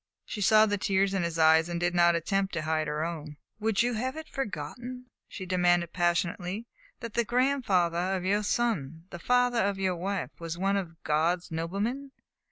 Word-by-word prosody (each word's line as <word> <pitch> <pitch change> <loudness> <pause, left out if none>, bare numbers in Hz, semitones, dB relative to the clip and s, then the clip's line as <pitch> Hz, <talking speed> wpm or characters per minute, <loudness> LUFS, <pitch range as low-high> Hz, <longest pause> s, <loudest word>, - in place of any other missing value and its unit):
She 210 - -6
saw 215 +2 +6
the 205 -2 -1
tears 195 0 +1
in 195 - 0
his 170 -1 -2
eyes 160 +1 +5
and 170 0 -2
did 175 0 0
not 170 -1 +4
attempt 195 +4 -1
to 170 - -2
hide 155 0 0
her 150 +1 -1
own. 155 -3 -6 0.2
"Would 220 0 +2
you 245 0 0
have 255 +6 -2
it 315 0 -7
forgotten," 245 - -5 0.2
she 190 - -7
demanded 175 -2 +2
passionately, 175 +4 -1 0.4
"that 230 -3 -6
the 235 - +2
grandfather 195 -8 +1
of 185 -1 -4
your 205 +2 +2
son 175 - -1
the 175 - -7
father 245 +3 +2
of 200 0 0
your 190 -2 0
wife 195 +3 -3
was 165 0 -5
one 195 +2 +1
of 170 -4 -5
God's 165 +4 0
noblemen? 205 +12 -3
185 Hz, 185 wpm, -28 LUFS, 170-215 Hz, 0.4 s, saw